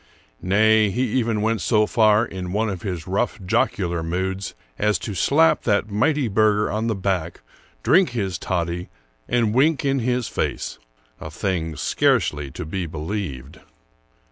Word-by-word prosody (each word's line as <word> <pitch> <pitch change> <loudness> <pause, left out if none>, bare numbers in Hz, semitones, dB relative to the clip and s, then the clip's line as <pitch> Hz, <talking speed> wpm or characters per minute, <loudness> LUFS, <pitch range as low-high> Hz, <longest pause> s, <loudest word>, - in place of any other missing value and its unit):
Nay, 110 +3 +4
he 120 +6 -1
even 115 -4 0
went 110 0 0
so 110 -2 +3
far, 110 0 +3
in 95 -4 -6
one 110 +2 0
of 95 -4 -5
his 90 -5 -4
rough, 100 +5 -1
jocular 90 -4 0
moods, 95 +4 -3 0.2
as 105 -2 +2
to 100 +5 -5
slap 155 - +3
that 100 -1 0
mighty 145 +5 +1
burgher 105 0 +2
on 110 +2 -1
the 110 - 0
back, 95 -4 -2 0.4
drink 185 -2 +4
his 100 -7 -3
toddy, 85 -1 -2 0.4
and 115 -3 +1
wink 145 +4 +2
in 135 0 +1
his 125 0 0
face, - - -3 0.2
— - - -35
a 80 - -6
thing 80 -1 -2
scarcely 75 -2 +1
to 65 - -7
be 90 +2 -3
believed. 80 -3 -5
105 Hz, 155 wpm, -22 LUFS, 90-115 Hz, 0.4 s, Nay